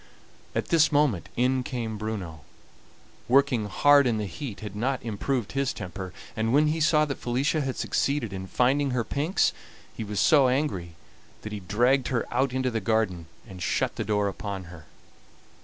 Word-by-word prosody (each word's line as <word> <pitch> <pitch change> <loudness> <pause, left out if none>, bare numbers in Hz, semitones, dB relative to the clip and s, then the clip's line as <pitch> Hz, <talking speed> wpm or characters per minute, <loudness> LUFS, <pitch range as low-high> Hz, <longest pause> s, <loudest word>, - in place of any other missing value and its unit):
At - - -1
this 165 -2 +4
moment 125 - +2
in 130 +2 +2
came 115 -4 -4
Bruno. 100 -8 -5 0.9
Working 130 -4 +3
hard 140 +6 +5
in 115 -3 +1
the 105 - -2
heat 100 - -7
had 105 -2 -7
not 130 +5 -1
improved 115 +1 -2
his 135 -1 0
temper, 90 +1 -6 0.2
and 110 0 0
when 150 +3 +4
he 160 +2 -1
saw 155 -1 +4
that 140 -2 -5
Felicia 140 +7 0
had 135 -2 -2
succeeded 140 -8 -1
in 95 0 -5
finding 135 +6 +2
her 120 - +1
pinks 155 - +1 0.4
he - - -4
was 105 -1 -3
so 140 -4 +5
angry 125 - -1 0.5
that 110 - -6
he 105 - -4
dragged 120 +8 +2
her 125 -3 0
out 130 +2 +1
into 130 0 -1
the 110 -1 -2
garden 95 -6 0 0.2
and 95 -4 -10
shut - - 0
the - - -2
door 105 -1 +1
upon 100 -1 -5
her. 80 -3 -12
120 Hz, 175 wpm, -26 LUFS, 105-140 Hz, 0.9 s, hard